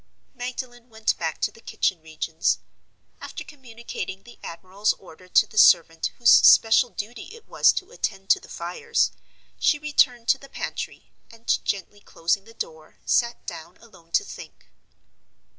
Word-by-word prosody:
Magdalen 245 Hz, -1 st, -7 dB
went 220 Hz, -1 st, 0 dB
back 160 Hz, -2 st, -3 dB
to -, -, +1 dB
the 225 Hz, -, -18 dB
kitchen 185 Hz, -6 st, -1 dB
regions. 160 Hz, 0 st, -1 dB, 0.6 s
After -, -, -7 dB
communicating 235 Hz, -, -8 dB
the 240 Hz, -, -16 dB
admiral's 190 Hz, +5 st, -2 dB
order 185 Hz, 0 st, -16 dB
to -, -, +5 dB
the 215 Hz, -, -1 dB
servant 165 Hz, -4 st, +5 dB
whose 235 Hz, -1 st, +5 dB
special 230 Hz, +2 st, +7 dB
duty 225 Hz, +2 st, -7 dB
it 460 Hz, -, -17 dB
was -, -, +5 dB
to 375 Hz, +4 st, -5 dB
attend 195 Hz, -, -2 dB
to -, -, +5 dB
the -, -, -16 dB
fires, 465 Hz, -1 st, -1 dB, 0.5 s
she 300 Hz, -, +3 dB
returned 265 Hz, -5 st, +2 dB
to 270 Hz, -, +4 dB
the 275 Hz, -, -14 dB
pantry, -, -, -6 dB, 0.2 s
and, 230 Hz, 0 st, -1 dB
gently 205 Hz, +1 st, -3 dB
closing 195 Hz, +1 st, -1 dB
the 225 Hz, 0 st, -16 dB
door, 160 Hz, -6 st, -8 dB
sat 235 Hz, -1 st, +1 dB
down 170 Hz, +1 st, -8 dB
alone 170 Hz, -8 st, -19 dB
to -, -, +4 dB
think. -, -, -12 dB
225 Hz, 155 wpm, -24 LUFS, 180-245 Hz, 0.6 s, special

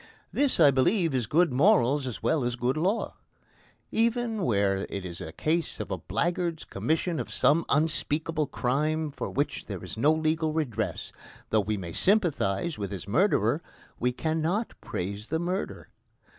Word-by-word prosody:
This, 285 Hz, -2 st, +2 dB
I 145 Hz, -, +8 dB
believe, 165 Hz, +5 st, +2 dB
is 125 Hz, -5 st, 0 dB
good 170 Hz, -, +3 dB
morals 140 Hz, -, +4 dB
as 125 Hz, -, -6 dB
well 155 Hz, -5 st, +2 dB
as 120 Hz, 0 st, -1 dB
good 125 Hz, +2 st, 0 dB
law. 185 Hz, +8 st, -1 dB, 0.7 s
Even 230 Hz, -1 st, +1 dB
where 100 Hz, -, +1 dB
it 100 Hz, -2 st, -5 dB
is 85 Hz, -2 st, -7 dB
a 80 Hz, -, -6 dB
case 160 Hz, -, -1 dB
of -, -, -5 dB
a -, -, -1 dB
blackguard's 170 Hz, -2 st, -1 dB
commission 165 Hz, +1 st, -1 dB
of -, -, -5 dB
some 160 Hz, +4 st, +3 dB
unspeakable 155 Hz, 0 st, 0 dB
crime 150 Hz, +6 st, 0 dB
for -, -, -5 dB
which 145 Hz, +1 st, -2 dB
there -, -, -6 dB
is -, -, -7 dB
no 145 Hz, +7 st, +4 dB
legal 155 Hz, 0 st, +1 dB
redress, 150 Hz, -9 st, -2 dB, 0.4 s
though 110 Hz, -, +4 dB
we 105 Hz, +1 st, -2 dB
may 85 Hz, -3 st, -6 dB
sympathise 170 Hz, -, +1 dB
with 100 Hz, -2 st, -3 dB
his 95 Hz, -2 st, -6 dB
murderer, 140 Hz, -, +2 dB, 0.4 s
we 125 Hz, +1 st, +1 dB
cannot 160 Hz, -, -1 dB
praise 100 Hz, +4 st, -4 dB
the 160 Hz, -, 0 dB
murder. 180 Hz, +4 st, -3 dB
155 Hz, 160 wpm, -28 LUFS, 120-170 Hz, 0.7 s, I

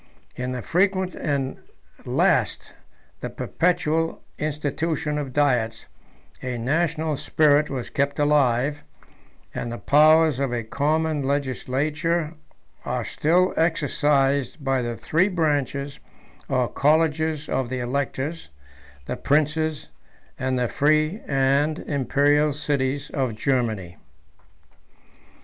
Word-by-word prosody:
In 125 Hz, 0 st, -3 dB
the 125 Hz, -2 st, -4 dB
frequent 185 Hz, 0 st, +1 dB
and 140 Hz, -3 st, -2 dB, 0.4 s
at -, -, -17 dB
last -, -, +1 dB, 0.5 s
the -, -, -5 dB
perpetual 165 Hz, -2 st, 0 dB, 0.2 s
institution 150 Hz, +1 st, -2 dB
of 140 Hz, -3 st, -4 dB
diets, 125 Hz, -5 st, +1 dB, 0.6 s
a 125 Hz, -1 st, -3 dB
national 155 Hz, +4 st, 0 dB
spirit 150 Hz, +1 st, +3 dB
was 130 Hz, -3 st, -5 dB
kept 140 Hz, -1 st, 0 dB
alive, 145 Hz, -1 st, +2 dB, 0.7 s
and 120 Hz, -, -4 dB
the 120 Hz, -, -4 dB
powers 155 Hz, 0 st, +5 dB
of 140 Hz, -3 st, 0 dB
a 120 Hz, -1 st, -2 dB
common 155 Hz, +5 st, 0 dB
legislature 145 Hz, +4 st, -1 dB, 0.5 s
are -, -, -2 dB
still 180 Hz, +4 st, +2 dB
exercised 145 Hz, -4 st, +1 dB
by 135 Hz, -1 st, +1 dB
the 120 Hz, -1 st, -3 dB
three 170 Hz, +5 st, +2 dB
branches 145 Hz, -, -1 dB, 0.5 s
or 130 Hz, -2 st, +1 dB
colleges 155 Hz, +1 st, +1 dB
of 130 Hz, -3 st, -1 dB
the 130 Hz, -, -3 dB
electors, 140 Hz, -, -3 dB, 0.6 s
the -, -, -3 dB
princes, 155 Hz, +1 st, 0 dB, 0.5 s
and 130 Hz, 0 st, 0 dB
the 125 Hz, -1 st, +1 dB
free 155 Hz, -, +1 dB
and 140 Hz, +3 st, +2 dB
Imperial 145 Hz, +1 st, +1 dB
cities 140 Hz, -1 st, -1 dB
of 130 Hz, -6 st, -1 dB
Germany. 110 Hz, -, -1 dB
145 Hz, 110 wpm, -24 LUFS, 130-155 Hz, 0.7 s, powers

